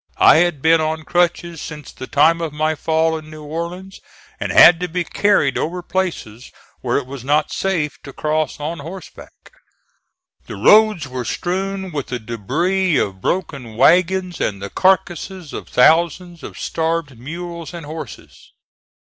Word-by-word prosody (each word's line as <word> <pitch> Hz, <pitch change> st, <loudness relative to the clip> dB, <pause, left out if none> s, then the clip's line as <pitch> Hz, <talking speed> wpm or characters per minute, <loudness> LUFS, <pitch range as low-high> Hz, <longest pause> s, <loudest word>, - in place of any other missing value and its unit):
I -, -, +7 dB
had 165 Hz, -4 st, +1 dB
been 160 Hz, 0 st, +5 dB
on 155 Hz, 0 st, -2 dB
crutches 170 Hz, -1 st, 0 dB
since 150 Hz, -3 st, -8 dB
the 130 Hz, -, -9 dB
time 165 Hz, +4 st, +3 dB
of 165 Hz, -2 st, -3 dB
my 155 Hz, +1 st, 0 dB
fall 160 Hz, +1 st, 0 dB
in 155 Hz, 0 st, -14 dB
New 155 Hz, 0 st, -10 dB
Orleans, 170 Hz, +5 st, -6 dB, 0.4 s
and -, -, -3 dB
had 165 Hz, -1 st, +8 dB
to 180 Hz, -, -2 dB
be 180 Hz, +1 st, -2 dB
carried 185 Hz, -7 st, +1 dB
over 175 Hz, +3 st, -3 dB
places 165 Hz, -, -4 dB, 0.3 s
where -, -, 0 dB
it -, -, -2 dB
was 130 Hz, -1 st, -9 dB
not 150 Hz, +3 st, +1 dB
safe 170 Hz, -6 st, -2 dB
to 140 Hz, -, -10 dB
cross 155 Hz, 0 st, -2 dB
on 160 Hz, +3 st, -4 dB
horseback. 170 Hz, +6 st, -11 dB, 1.0 s
The -, -, -7 dB
roads 210 Hz, -7 st, +4 dB
were 125 Hz, -1 st, -5 dB
strewn 190 Hz, +6 st, -3 dB
with 145 Hz, -4 st, -4 dB
the 125 Hz, -, -3 dB
debris 150 Hz, -, -1 dB
of 95 Hz, -2 st, -2 dB
broken 140 Hz, -, -3 dB
wagons 180 Hz, +5 st, +3 dB
and 100 Hz, -2 st, -1 dB
the 100 Hz, 0 st, -7 dB
carcasses 185 Hz, -2 st, 0 dB
of -, -, -7 dB
thousands 170 Hz, +4 st, +2 dB
of -, -, -9 dB
starved 160 Hz, -4 st, -2 dB
mules 170 Hz, +4 st, -7 dB
and 170 Hz, -3 st, -8 dB
horses. 155 Hz, -4 st, -10 dB
160 Hz, 160 wpm, -19 LUFS, 145-175 Hz, 1.0 s, had